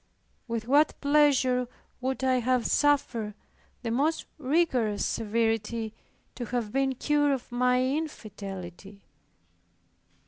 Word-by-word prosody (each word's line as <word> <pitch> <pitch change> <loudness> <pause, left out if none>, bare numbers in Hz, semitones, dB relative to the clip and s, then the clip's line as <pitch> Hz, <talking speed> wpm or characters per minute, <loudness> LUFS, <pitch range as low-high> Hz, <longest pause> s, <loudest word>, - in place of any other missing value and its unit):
With 230 -1 -3
what 290 +4 +3
pleasure 280 -4 +3 0.3
would 265 +1 -2
I 260 -1 +3
have 250 0 +1
suffered 245 -8 +1 0.5
the 230 - -2
most 300 +7 +1
rigorous 260 -8 +1
severity 225 0 -1 0.4
to 245 - -5
have 235 -3 -2
been 270 +1 +1
cured 290 +2 +2
of 260 -2 -5
my 250 +1 +2
infidelity. 200 - -5
250 Hz, 105 wpm, -28 LUFS, 225-280 Hz, 0.5 s, what